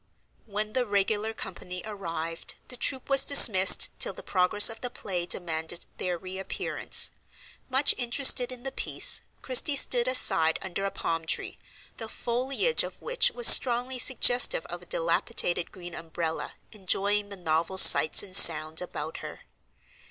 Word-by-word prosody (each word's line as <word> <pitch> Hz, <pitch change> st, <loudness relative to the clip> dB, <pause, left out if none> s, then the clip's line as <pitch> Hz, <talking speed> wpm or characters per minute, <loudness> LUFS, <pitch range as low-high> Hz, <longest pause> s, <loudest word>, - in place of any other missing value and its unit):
When 210 Hz, +1 st, -6 dB
the 255 Hz, -2 st, -2 dB
regular 205 Hz, +2 st, -2 dB
company 180 Hz, -4 st, -8 dB
arrived, 165 Hz, -6 st, -7 dB
the 250 Hz, -, -8 dB
troop 260 Hz, +1 st, -3 dB
was 275 Hz, -1 st, +4 dB
dismissed 195 Hz, -9 st, +6 dB
till -, -, 0 dB
the -, -, -13 dB
progress 185 Hz, +2 st, +2 dB
of 225 Hz, -, -8 dB
the 245 Hz, -, -5 dB
play 180 Hz, -6 st, -6 dB
demanded 165 Hz, -1 st, -4 dB
their 180 Hz, -1 st, -4 dB
reappearance. 190 Hz, +2 st, -3 dB, 0.6 s
Much 265 Hz, +2 st, +3 dB
interested 250 Hz, +1 st, +2 dB
in 250 Hz, -1 st, -10 dB
the 270 Hz, -, -6 dB
piece, -, -, 0 dB, 0.2 s
Christie 260 Hz, +3 st, +3 dB
stood 245 Hz, -3 st, +2 dB
aside 165 Hz, -10 st, +1 dB
under 190 Hz, +1 st, -6 dB
a -, -, -2 dB
palm 165 Hz, -3 st, -5 dB
tree, -, -, -5 dB, 0.4 s
the 225 Hz, -1 st, -9 dB
foliage 260 Hz, -, -1 dB
of -, -, -10 dB
which -, -, 0 dB
was 480 Hz, -, -1 dB
strongly 250 Hz, +1 st, +4 dB
suggestive 250 Hz, -, +3 dB
of -, -, -8 dB
a -, -, -17 dB
dilapidated -, -, -2 dB
green 175 Hz, -2 st, -11 dB
umbrella, 165 Hz, 0 st, -6 dB, 0.2 s
enjoying 205 Hz, 0 st, -3 dB
the 200 Hz, -, -10 dB
novel 165 Hz, +1 st, -3 dB
sights 155 Hz, -, +6 dB
and 190 Hz, -2 st, -8 dB
sounds 160 Hz, -4 st, +4 dB
about 180 Hz, -, -7 dB
her. -, -, -11 dB
205 Hz, 150 wpm, -25 LUFS, 175-250 Hz, 0.6 s, dismissed